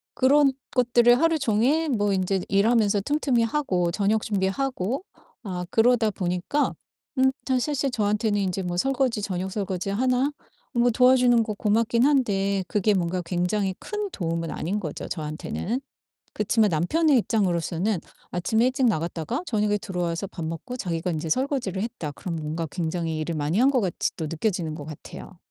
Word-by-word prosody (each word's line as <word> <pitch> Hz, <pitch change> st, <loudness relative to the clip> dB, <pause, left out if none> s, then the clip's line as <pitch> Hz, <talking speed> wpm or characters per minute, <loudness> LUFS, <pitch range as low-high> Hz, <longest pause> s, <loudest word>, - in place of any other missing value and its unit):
그런 275 Hz, +1 st, +5 dB, 0.2 s
것들을 240 Hz, 0 st, +5 dB
하루 330 Hz, -1 st, +3 dB
종일 275 Hz, +7 st, +2 dB
뭐 205 Hz, -5 st, +1 dB
인제 190 Hz, 0 st, 0 dB
일하면서 205 Hz, 0 st, +3 dB
틈틈이 270 Hz, -2 st, +1 dB
하고 195 Hz, -10 st, 0 dB
저녁 210 Hz, +3 st, +1 dB
준비하고 215 Hz, -, -1 dB, 0.4 s
아 180 Hz, -3 st, -4 dB
그러다 225 Hz, -1 st, +3 dB
보니까 180 Hz, +10 st, -1 dB, 0.5 s
음 265 Hz, 0 st, +5 dB, 0.2 s
사실 260 Hz, +3 st, +1 dB
실제 275 Hz, 0 st, 0 dB
저한테는 210 Hz, -1 st, +1 dB
이제 190 Hz, 0 st, -1 dB
뭐 175 Hz, 0 st, -3 dB
설거지 260 Hz, -1 st, +1 dB
저녁 190 Hz, -1 st, -3 dB
설거지 195 Hz, -2 st, -3 dB
하나 255 Hz, +5 st, +1 dB, 0.4 s
뭐 240 Hz, 0 st, +3 dB
도와주는 250 Hz, -1 st, +5 dB
거 215 Hz, -1 st, -3 dB
고맙기는 230 Hz, +4 st, +2 dB
한데 200 Hz, -8 st, +1 dB
그게 210 Hz, 0 st, +2 dB
뭔가 180 Hz, 0 st, -1 dB
굉장히 185 Hz, +3 st, 0 dB
큰 420 Hz, -1 st, -4 dB
도움은 165 Hz, -2 st, -2 dB
아닌 200 Hz, +6 st, -2 dB
거죠 155 Hz, -7 st, -5 dB
저한테는. 160 Hz, -, -4 dB, 0.5 s
그치만 210 Hz, 0 st, +2 dB
남편의 270 Hz, -, +2 dB
입장으로서는 190 Hz, -3 st, 0 dB, 0.3 s
'아침에 220 Hz, +7 st, +1 dB
일찍 260 Hz, 0 st, +1 dB
나갔다가 170 Hz, -, -1 dB
저녁에 210 Hz, -2 st, +1 dB
들어와서 180 Hz, 0 st, -3 dB
밥 170 Hz, -3 st, -6 dB
먹고 245 Hz, +11 st, -5 dB
자기가 170 Hz, -3 st, -2 dB
인제 160 Hz, 0 st, -3 dB
설거지를 250 Hz, -, -1 dB
했다.' 200 Hz, -11 st, -5 dB
그럼 170 Hz, +3 st, -5 dB
뭔가 160 Hz, +1 st, -3 dB
굉장히 165 Hz, -2 st, -2 dB
일을 165 Hz, +2 st, -2 dB
많이 150 Hz, +5 st, -1 dB
한 265 Hz, +2 st, +5 dB
것 255 Hz, -4 st, +2 dB
같이 185 Hz, -3 st, -1 dB
또 160 Hz, -, -4 dB
느껴지는 165 Hz, -1 st, -2 dB
것 145 Hz, -, -7 dB
같아요. 160 Hz, +4 st, -10 dB
205 Hz, 360 characters per minute, -25 LUFS, 180-245 Hz, 0.5 s, 그런